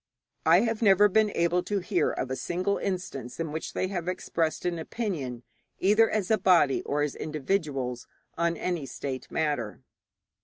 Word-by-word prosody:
I 170 +4 +7
have 225 -1 -1
never 205 -1 +6
been 215 +2 +3
able 170 +1 +2
to 205 +3 -2
hear 190 0 +1
of 130 - -3
a - - 0
single 185 +7 -1
instance 170 -10 -4
in 165 -2 -2
which 160 +1 -5
they - - -1
even 180 -2 -3
expressed 165 -3 -2
an 175 -2 -1
opinion 155 - -4 0.3
either 215 +4 +4
as 215 -1 -1
a 220 - +4
body 170 -7 +4
or 145 +1 -1
as 150 - -1
individuals 145 -6 -2 0.3
on 170 0 0
any 170 -6 -2
state 130 +1 -5
matter. 145 -9 -2
170 Hz, 165 wpm, -28 LUFS, 145-195 Hz, 0.3 s, I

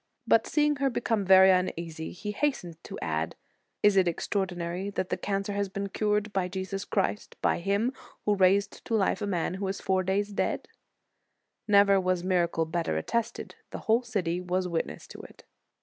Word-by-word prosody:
But 225 -1 +4
seeing 295 -1 +2
her 275 0 +1
become 230 -4 0
very 190 0 +8
uneasy, 170 -3 -1
he 210 +4 -5
has 290 +7 +1
tened 170 -2 -10
to - - -7
add: 80 0 -2 0.5
Is 210 -1 +5
it 190 -2 +4
extraordinary 180 +1 -2
that 190 -2 -3
the - - 0
cancer 200 0 -2
has 200 -1 -1
been 200 +1 -4
cured 210 0 0
by 190 -2 0
Jesus 190 +1 -4
Christ, 205 +1 -1
by - - +1
Him 200 +8 0 0.3
who 210 - +3
raised 195 +1 +2
to 230 - 0
life 205 0 +1
a 205 - -1
man 175 -3 -1
who 195 +1 -3
was 195 +1 -3
four 190 -1 +1
days 200 +2 -1
dead? - - -1 0.5
"* - - -51
Never 200 -2 +5
was 185 -1 0
miracle 175 -3 +1
better 165 - -1
attested; 235 - -2 0.2
the - - -6
whole 225 +2 +4
city 185 -8 -2
was 180 +1 -1
witness 170 -2 -3
to - - -10
it. - - -15
195 Hz, 185 wpm, -28 LUFS, 180-205 Hz, 0.5 s, very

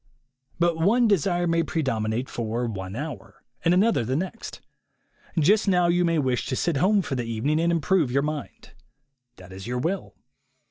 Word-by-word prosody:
But 170 -1 +1
one 230 +8 +4
desire 175 -3 +1
may 165 -1 +2
predominate 125 -7 -1
for 115 +1 -3
one 95 -4 -5
hour, 150 +5 -7 0.2
and 165 - +3
another 195 - +3
the 130 +4 -2
next. 190 +8 -5 0.8
Just 200 +8 +3
now 180 -2 +3
you 175 +1 +3
may 165 -1 +1
wish 130 -4 0
to 135 - -1
sit 165 +2 0
home 195 +6 +3
for 145 - -4
the 120 -2 -2
evening 115 +7 0
and 170 +1 +2
improve 170 -2 +2
your 140 +2 +1
mind. 150 -1 -6 0.6
That 95 0 -14
is 95 +3 -8
your 125 +1 -2
will. 175 +9 -3
155 Hz, 175 wpm, -25 LUFS, 125-175 Hz, 0.8 s, one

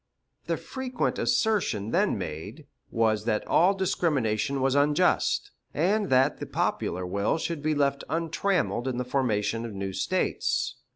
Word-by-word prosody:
The - - 0
frequent 260 -2 -3
assertion 150 - +1
then - - +2
made 80 +1 -6 0.2
was 110 -2 +1
that 110 -2 0
all 185 +4 +4
discrimination 140 - 0
was 135 0 +2
unjust, 150 +5 +2 0.2
and 195 +6 +1
that 130 +1 +3
the - - -5
popular 90 +1 -1
will 100 - 0
should 165 -1 -3
be 155 +1 0
left 140 -1 +1
untrammeled 165 -4 0
in 130 -2 -2
the 125 - -2
formation 115 -4 0
of 115 -2 -6
new 95 0 -4
States. 185 - -1
135 Hz, 140 wpm, -27 LUFS, 110-170 Hz, 0.2 s, all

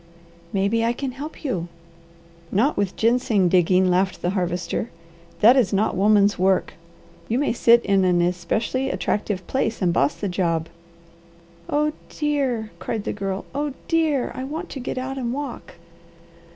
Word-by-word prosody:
"Maybe 205 +3 +1
I 230 +1 +2
can 265 +2 -4
help 290 +6 -8
you." 180 - -2 0.8
"Not 245 +10 +2
with 200 -2 -1
ginseng 225 -5 +2
digging," 185 +1 +4
laughed 185 +1 0
the 175 - +1
Harvester. 180 +3 -2 0.5
"That 235 +5 +8
is 240 -8 +3
not 205 +2 +1
woman's 205 0 +3
work. 190 0 +2 0.5
You 235 - 0
may 285 -3 +1
sit 235 0 +4
in 195 -1 +3
an 180 -1 +3
especially 180 +9 0
attractive 205 -6 -2
place 230 -2 -1
and 175 -3 +1
boss 140 -3 +2
the 205 - -3
job." 170 -3 -1 1.0
"Oh 300 +1 +1 0.2
dear!" 270 -7 -1
cried 220 -3 -3
the - - -3
Girl. 195 -1 -4
"Oh 290 0 -2
dear! 315 -5 +1
I 255 - -5
want 315 +6 -5
to 275 - -6
get 255 - -4
out 265 +1 -3
and 240 -2 -2
walk." 275 -1 -6
220 Hz, 155 wpm, -23 LUFS, 185-260 Hz, 1.0 s, That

